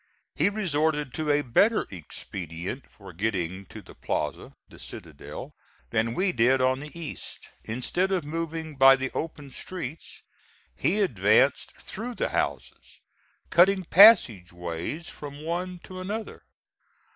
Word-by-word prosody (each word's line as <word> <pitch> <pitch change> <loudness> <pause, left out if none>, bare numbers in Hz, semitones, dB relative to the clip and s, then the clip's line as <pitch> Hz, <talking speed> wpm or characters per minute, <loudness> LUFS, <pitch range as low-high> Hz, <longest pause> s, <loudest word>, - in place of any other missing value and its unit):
He - - +2
resorted 155 -8 0
to 155 +2 -2
a 145 0 +3
better 200 - +3
expedient 90 - -7
for 95 -3 -13
getting 95 -1 -2
to - - -11
the - - -14
plaza - - -3
the - - -16
citadel - - -9 0.4
than 115 +1 0
we 185 0 +2
did 125 +1 +3
on 130 +1 +2
the 150 +4 -8
east. 160 -3 -7 0.2
Instead 130 - -1
of 185 -4 +1
moving 160 0 -4
by 135 0 +8
the 130 0 -3
open 150 -4 -5
streets, 160 0 -7 0.5
he 205 +4 +1
advanced 115 - +3
through 235 +4 -7
the - - -1
houses, - - -3 0.5
cutting 190 +2 +5
passageways 110 - +4
from 145 0 -9
one 180 +2 -3
to 185 0 -9
another. 210 +4 -5
145 Hz, 130 wpm, -27 LUFS, 115-180 Hz, 0.5 s, by